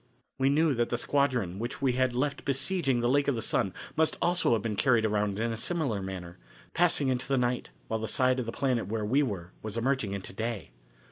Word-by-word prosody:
We 135 +1 +3
knew 155 +1 +3
that 120 -1 0
the 120 - 0
squadron 125 -9 0
which 120 +4 -4
we 135 -2 +2
had 130 -1 +1
left 140 +3 -1
besieging 140 -1 +1
the 120 - +2
Lake 140 +3 +2
of 140 - +2
the 115 - -2
Sun 95 - +1 0.2
must 160 0 +2
also 175 -7 +2
have 110 -3 0
been 110 -2 -2
carried 120 -1 +3
around 105 -2 0
in 115 +2 0
a - - -3
similar 130 - -1
manner, 90 -5 -7 0.3
passing 165 -5 +3
into 130 0 -1
the 135 - +1
night 125 0 0 0.2
while 110 - -1
the 110 - -3
side 130 +4 +2
of 120 - -3
the - - -2
planet 125 -2 0
where 110 0 -2
we 130 +7 +3
were 95 -10 -3
was 110 +1 -5
emerging 120 -4 0
into 100 -1 -6
day. 110 - -4
120 Hz, 225 wpm, -29 LUFS, 110-140 Hz, 0.3 s, We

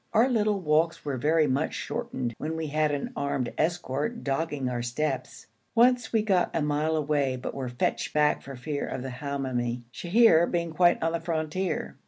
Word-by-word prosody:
Our 225 +3 +5
little 215 -5 +1
walks 160 -1 +1
were 140 -3 -2
very 155 +4 +3
much 140 +2 0
shortened 180 - -3
when 160 +2 -3
we 160 - -2
had 155 +1 +1
an 145 -1 -3
armed 140 -3 -2
escort 165 - -1
dogging 140 -1 -1
our 125 -1 -2
steps. 120 +6 -3 0.3
Once 245 +1 +4
we 220 -2 +2
got 190 -4 +2
a 165 - +1
mile 150 +2 +1
away 145 -3 +1
but 125 - -5
were 130 -2 -4
fetched 120 0 -1
back 150 0 +2
for 140 - -9
fear 145 +3 -3
of 130 - -4
the 130 - -5
Hamoumi, 125 -3 -3
Sheher 175 -3 +4
being 170 -1 -1
quite 175 +1 +3
on 165 - +1
the 170 - -1
frontier. 165 +2 -2
155 Hz, 185 wpm, -27 LUFS, 135-170 Hz, 0.3 s, Our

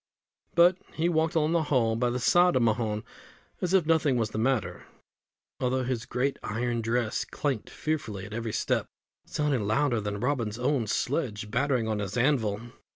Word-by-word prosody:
But 175 +2 +6 0.2
he 165 +2 +1
walked 160 -1 +1
along 155 0 +2
the 170 -1 +3
hall, 125 -7 +1
by 120 +2 +1
the 120 - -1
side 175 +8 +4
of 125 - +3
Mahon, 110 -2 0 0.6
as 180 - 0
if 185 -5 +4
nothing 155 -5 +3
was 110 -2 0
the - - -3
matter, 120 -3 -1 0.7
although 130 0 0
his 120 -2 -3
great 135 +3 -1
iron 120 +2 -2
dress 115 0 0
clanked 135 -7 -3
fearfully 115 -11 -3
at 105 - -9
every 115 -1 -3
step, - - 0 0.4
sounding 140 -8 0
louder 120 +1 +2
than 105 0 -3
Robin's 115 -4 -1
own 125 -2 0
sledge 110 -4 -2
battering 130 -2 +1
on 110 -1 -1
his 100 +3 -3
anvil. 120 -4 +1
125 Hz, 170 wpm, -28 LUFS, 110-145 Hz, 0.7 s, But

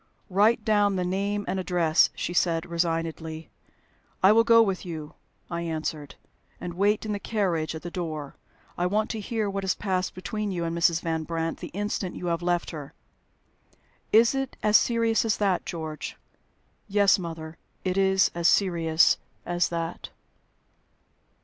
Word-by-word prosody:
"Write 215 +4 +3
down 205 -2 +3
the 180 -1 -1
name 200 +3 -1
and 190 - -1
address," 175 -3 +3
she 175 - -3
said 170 -2 +1
resignedly. 165 -1 -3 0.7
"I 190 - +8
will 225 +1 +6
go 230 0 +6
with 195 -4 -2
you," 160 -3 -7 0.3
I 170 0 -4
answered, 155 -3 -4 0.4
"and 175 -1 -5
wait 205 +4 +1
in 215 - -2
the 205 - -2
carriage 180 -8 -1
at 160 - -8
the 175 - -6
door. 155 -6 -5 0.4
I 175 - +2
want 215 +3 0
to 225 - -4
hear 215 0 -2
what 195 0 -2
has 190 - +1
passed 185 -2 -2
between 210 +3 -3
you 175 -2 -2
and 165 0 -2
Mrs. 170 -1 +2
Van 165 -2 -1
Brandt 165 0 -3
the - - -6
instant 205 -1 -3
you - - -6
have 170 - -3
left 175 0 0
her." 150 -4 -8 1.2
"Is 230 +3 +6
it 270 -1 -3
as 210 0 +3
serious 230 -1 +3
as 225 -2 +1
that, 195 -3 0
George?" 160 -2 -5 0.7
"Yes, 200 -1 +4
mother, 165 -2 -7 0.3
it 185 0 0
is 190 0 +3
as 170 0 +1
serious 165 -5 +3 0.3
as 175 0 +1
that." 170 0 -4
180 Hz, 160 wpm, -26 LUFS, 165-205 Hz, 1.2 s, I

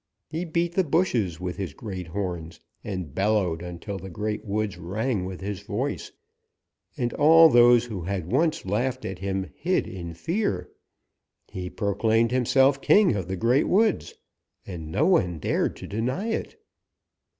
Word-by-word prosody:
He 165 +3 -3
beat 170 +1 -1
the 190 - +2
bushes 125 - 0
with 90 0 -4
his 90 -8 -5
great 95 -5 -6
horns 85 -3 -4 0.2
and 90 -8 -5
bellowed 95 -5 +1
until 90 +3 -6
the 95 +1 -8
Great 105 +4 -3
Woods 105 -1 -2
rang 105 +3 -2
with 95 0 -7
his 100 -1 -4
voice, - - -3 0.9
and 120 -1 -1
all 160 +2 +7
those 120 -2 +6
who 105 -6 -5
had 90 0 -4
once 155 - +1
laughed 125 +7 -1
at 95 -1 -5
him 95 -1 -3
hid 180 +3 0
in 85 -3 -7
fear. 100 - -2 0.8
He 90 -1 -5
proclaimed 110 +4 +1
himself 135 +2 +3
king 200 - +5
of 95 -4 -3
the 95 0 -3
Great 120 - +2
Woods, 215 +1 +2 0.5
and 80 -4 -7
no 150 - +2
one 95 - +2
dared 75 - 0
to - - -9
deny 130 - -2
it. 450 - -4
105 Hz, 155 wpm, -25 LUFS, 90-135 Hz, 0.9 s, all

